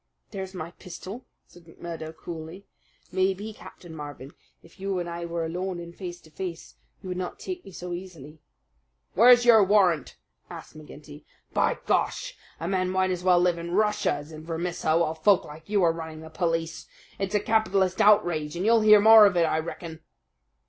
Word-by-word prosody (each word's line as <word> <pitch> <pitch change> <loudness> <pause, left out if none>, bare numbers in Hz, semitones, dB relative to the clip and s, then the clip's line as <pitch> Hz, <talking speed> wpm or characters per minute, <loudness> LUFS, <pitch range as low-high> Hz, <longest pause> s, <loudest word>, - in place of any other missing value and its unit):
"There's 190 -2 -6
my 170 -1 -6
pistol," 185 +6 -10 0.2
said 175 -1 -19
McMurdo 165 -1 -8
coolly. 165 +4 -8 0.5
"Maybe, 190 +3 -1
Captain 175 -5 -13
Marvin, 145 -2 -8 0.3
if 165 +3 -20
you 195 0 -2
and 175 -1 -3
I 170 0 -5
were 170 -1 -3
alone 180 +2 -4
and 170 0 -10
face 175 -2 -7
to 160 - -19
face 175 0 -7 0.3
you 185 - -7
would 180 0 -3
not 180 - -5
take 365 -1 -6
me 195 - -12
so 180 0 -7
easily." 165 -5 -9 0.7
"Where's 245 +2 +6
your 225 -3 +7
warrant?" 185 -7 +2 0.3
asked - - -10
McGinty. 150 -1 -12 0.3
"By - - +1
Gar! - - +2 0.5
a - - -4
man 185 -1 0
might 185 0 +1
as 180 -1 -3
well 180 -1 +5
live 175 -1 +1
in 170 +1 -4
Russia 210 0 +2
as 145 +2 -7
in 155 0 -10
Vermissa 165 -1 -1
while 170 -2 +1
folk 185 +4 +3
like 155 +3 -13
you 205 -3 +2
are 165 -1 +4
running 160 -1 -8
the 160 0 -11
police. 165 -1 -2 0.3
It's 195 +1 -2
a - - +4
capitalist 200 -4 +1
outrage, 175 -7 +3
and 180 +3 -3
you'll 230 0 +4
hear 215 -1 +7
more 220 0 +8
of 180 -3 -1
it, 170 - +4
I 160 -1 +1
reckon." 160 0 -7
175 Hz, 185 wpm, -26 LUFS, 160-195 Hz, 0.7 s, more